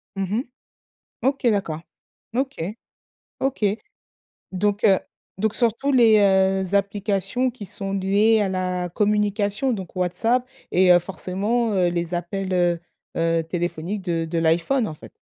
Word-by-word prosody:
Mmh 195 +2 -1
mh. - - -2 0.8
OK, 270 -2 0
d'accord. 170 -7 -1 0.6
OK. 270 -3 -1 0.8
OK. 265 -5 -1 0.9
Donc 205 +3 0
heu, 195 -3 +5 0.4
donc 220 +1 0
surtout 235 +4 +1
les, 230 -5 +6
heu, 190 -1 +3
applications 200 +5 0
qui 220 -4 -9
sont 195 +1 -5
liées 205 +3 +3
à 195 - 0
la 180 -1 -2
communication, 210 +4 +1
donc 190 -3 -7
WhatsApp 225 +8 0 0.2
et 185 0 +5
heu, 175 - +7
forcément, 205 +5 -1
heu, 180 -2 +3
les 170 0 -3
appels, 185 +2 -3
heu 175 -2 +2 0.4
heu, 165 0 +1
téléphoniques 175 +3 -3
de 170 -3 -1
de 165 +1 -3
l'iPhone, 170 +10 +2
en 155 - -5
fait. - - -13
195 Hz, 140 wpm, -23 LUFS, 180-215 Hz, 0.9 s, heu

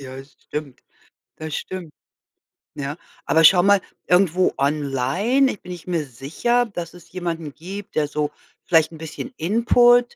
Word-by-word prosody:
ja, 135 0 -8
stimmt, 145 0 -8 0.6
das 155 -1 -5
stimmt, 180 -5 -6 0.8
ja. 145 +1 -4 0.3
Aber 160 - +4
schau 175 +3 +8
mal, 200 0 +5 0.3
irgendwo 180 0 +3
online, 150 - +1
ich 205 - -9
bin 180 - -9
ich 175 -1 -9
mir 170 -4 -1
sicher, 155 - 0
dass 175 -7 -6
es 175 -1 -16
jemanden 165 -4 -4
gibt, 190 +6 -9
der 150 -1 +2
so 150 0 -2 0.3
vielleicht 160 -2 +3
'n 160 - -10
bisschen 160 - -7
Input 240 +5 +4
165 Hz, 150 wpm, -22 LUFS, 150-195 Hz, 0.8 s, schau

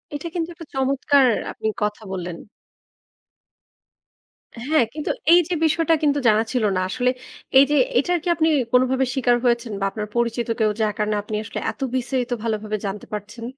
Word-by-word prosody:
এটা 290 +4 -5
কিন্তু 340 -1 -2
একটা 335 0 -11
চমৎকার 270 0 +3 0.2
আপনি - - -4 0.2
কথা 210 +1 -2
বললেন। 175 -2 -5 2.3
হ্যাঁ, 300 -4 +3
কিন্তু 300 0 -2 0.2
এই 350 - +8
যে 360 - -2
বিষয়টা 330 +1 +2
কিন্তু 285 -1 +2
জানা 215 0 +4
ছিল 250 -3 0
না, 185 - +1
আসলে 250 +4 +1 0.5
এইযে 280 +2 +4 0.2
এটার 355 0 +1
কি - - -6
আপনি 320 +1 +2 0.2
কোনোভাবে 255 +1 +3
শিকার 245 -3 +2
হয়েছেন 235 -1 +1
বা 195 - 0
আপনার 210 +1 -5
পরিচিত 235 0 0
কেউ 215 -1 +3
যার 215 -1 +1
কারণে 210 0 0
আপনি 210 0 -5
আসলে - - -6
এত - - -19
বিস্তারিত 255 -1 -2
ভালোভাবে 215 -1 -2
জানতে 195 +1 -5
পারছেন? 210 +3 -6
245 Hz, 165 wpm, -22 LUFS, 215-285 Hz, 2.3 s, এই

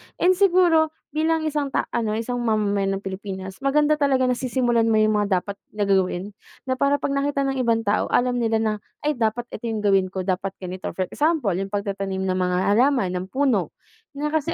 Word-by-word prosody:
and 365 - +3
siguro 350 -4 +3 0.2
bilang 320 +1 +1
isang 295 -2 -1
ta - - +2 0.3
isang 245 +2 -3
mamamayan 205 -4 0
ng 195 - -5
Pilipinas. 190 -1 -6
Maganda 295 +2 +2
talaga 270 -2 +2
nasisimulan 245 -2 +1
mo 225 - +3
yung 215 -1 +3
mga 195 -3 +1
dapat 200 0 -8 0.2
na 205 - 0
gagawin. 190 0 0 0.3
Na 260 -1 -2
para 280 +1 +3
pag 275 - -1
nakita 280 0 0
ng 270 -1 -1
ibang 230 -2 +2
tao 205 +1 +1
alam 245 0 +1
nila 225 -1 +1
na 215 -1 +1 0.3
ay 300 -3 0
dapat 225 +2 0
ito 235 - -7
yung 220 -2 -2
gawin 195 -2 +3
ko, 190 0 -4
dapat 190 +1 -2
ganito. 185 +1 -5
For 185 -1 -2
example, 300 - +1
yung 195 +1 -5
pagtatanim 195 -1 -2
ng 185 - 0
mga 180 0 +1
halaman 245 -3 +3
ng 180 - -4
puno 270 +3 0 0.4
na 295 +1 -2
kasi, 315 +2 0
225 Hz, 195 wpm, -23 LUFS, 195-280 Hz, 0.4 s, and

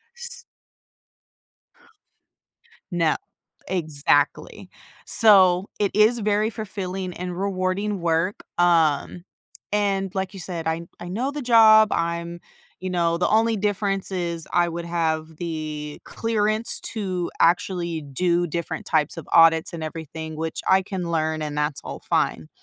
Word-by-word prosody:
S 485 0 +2 2.5
No. 170 -3 +1 0.5
Exactly, 150 -5 0 0.3
so, 190 -4 +6
it 205 -2 +1
is 220 +3 +4
very 210 +1 +1
fulfilling 195 -4 -5
and 180 0 -6
rewarding 195 +1 -1
work, 170 +3 0 0.2
um, 170 -1 +2 0.5
and 195 -2 0
like 190 -1 -2
you 195 - -9
said, 170 -2 -5
I 160 +1 -1 0.2
I 175 - -8
know 250 +8 -2
the 290 0 -6
job 220 -3 +7
I'm 170 +1 -2 0.4
you 185 - -4
know, 170 -2 +1
the 180 - +1
only 225 +1 +2
difference 200 -1 -1
is 170 -3 -2
I 175 0 +3
would 170 +1 -5
have 160 -2 -2
the 155 -3 -5
clearance 220 0 -1
to 185 -5 -3
actually 170 -1 +1
do 170 +5 0
different 170 0 -5
types 155 +1 +1
of 165 - -9
audits 165 +1 +5
and 160 -2 -5
everything, 160 0 -7
which 160 +1 -4
I 190 0 +5
can 185 -3 -5
learn 160 -1 -1
and 150 -1 -4
that's 150 -1 -1
all - - -7
fine. 80 -1 0
175 Hz, 135 wpm, -23 LUFS, 165-200 Hz, 2.5 s, job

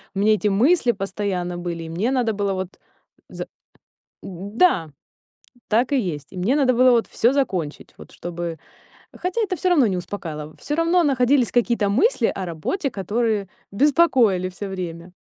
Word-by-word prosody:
у - - -2
меня 215 +2 +4
эти 215 0 0
мысли 245 - +3
постоянно 195 -3 -3
были, 170 -1 -4
и 165 - -8
мне 190 +10 -1
надо 250 -4 +1
было 200 -1 -1
вот 185 -1 -5 0.5
за - - -6 0.7
да 195 - 0 0.8
так 240 +6 +2
и 280 - +3
есть. 155 - -3
И - - -10
мне 200 +9 +1
надо 270 -4 +3
было 255 +1 +5
вот 235 -2 +2
всё 235 - +2
закончить, 185 - -2
вот - - -12
чтобы 170 -1 -5 0.6
Хотя 365 +6 -2
это 390 -4 -1
всё 370 - -1
равно 295 -9 +4
не 190 -3 -1
успокаивало, 155 -5 -6
всё 295 - -3
равно 335 +2 +3
находились 260 -3 +2
какие-то 235 -4 +1
мысли 240 - +2
о 190 - -3
работе, 180 - -3
которые 210 0 -1 0.2
беспокоили 250 - +3
всё 195 +2 -7
время. 175 -2 -6
205 Hz, 165 wpm, -22 LUFS, 180-260 Hz, 0.8 s, было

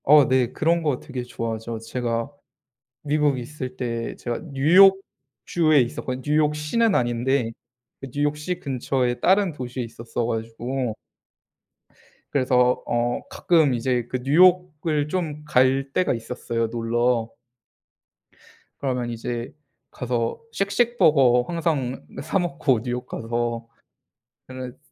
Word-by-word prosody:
어 145 -1 +7
네. 130 -2 +2
그런 170 +4 +1
거 145 -5 0
되게 130 -3 -6
좋아하죠. 115 -1 -4
제가 115 +2 -3 0.7
미국에 145 -3 +1
있을 130 0 -7
때 115 -2 -3
제가 120 -1 -4
뉴욕주에 155 -2 +3
있었거든요. 125 +1 -3
뉴욕시는 150 +8 +2
아닌데, 120 0 +1 0.5
그 135 - -7
뉴욕시 150 +5 -1
근처에 130 -4 -1
다른 190 0 +3
도시에 125 -3 -5
있었어 115 0 -4
가지고 115 +1 -3 1.4
그래서 125 -2 +2
어 120 0 0
가끔 160 -7 +3
이제 120 0 -1
그 130 - -1
뉴욕을 160 -1 +3
좀 155 -4 -3
갈 135 0 +2
때가 185 - +2
있었어요 115 0 -3
놀러. 115 0 0 1.5
그러면 125 -3 -2
이제 120 +1 -4 0.4
가서 120 -2 -2
쉑쉑버거 160 - +3
항상 155 -7 -2 0.2
사 165 +5 0
먹고 165 -9 +1
뉴욕 125 0 -3
가서 115 0 -3 0.8
근데 130 -1 -8
130 Hz, 240 characters per minute, -24 LUFS, 120-150 Hz, 1.5 s, 어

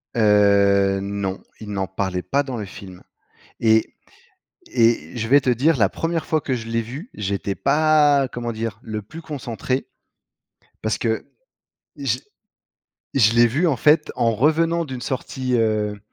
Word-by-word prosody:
Heu, 100 -2 +4
non, 100 -1 -3 0.2
ils 110 - -9
n'en 95 -2 -2
parlaient 95 -1 -3
pas 140 +9 0
dans 130 -3 -5
le 105 - -4
film 95 -2 -11 0.6
et 110 -1 +2 0.8
et 115 - +2
je 115 -1 -2
vais 140 +4 +5
te 130 - 0
dire, 140 +7 +3
la 100 -5 +3
1re 165 +4 -2
fois 155 - +1
que 135 - -2
je 115 -2 -6
l'ai 115 0 0
vu, 135 - -8
j'étais 100 -1 -3
pas, 145 +1 +3
comment 120 -1 -4
dire? 110 -2 -4
Le 110 -1 -5
plus 160 +11 -11
concentré, 130 -4 -4 0.9
parce 110 0 -1
que 110 -1 -1 0.7
j - - -1 1.0
je 115 -4 +5
l'ai 120 0 +6
vu, 150 +10 +1
en 150 - +2
fait, 150 +4 +3
en 115 -1 +2
revenant 165 +6 +2
d'une 130 -3 -7
sortie, 130 0 -2
heu, 105 -2 0
115 Hz, 155 wpm, -22 LUFS, 105-140 Hz, 1.0 s, l'ai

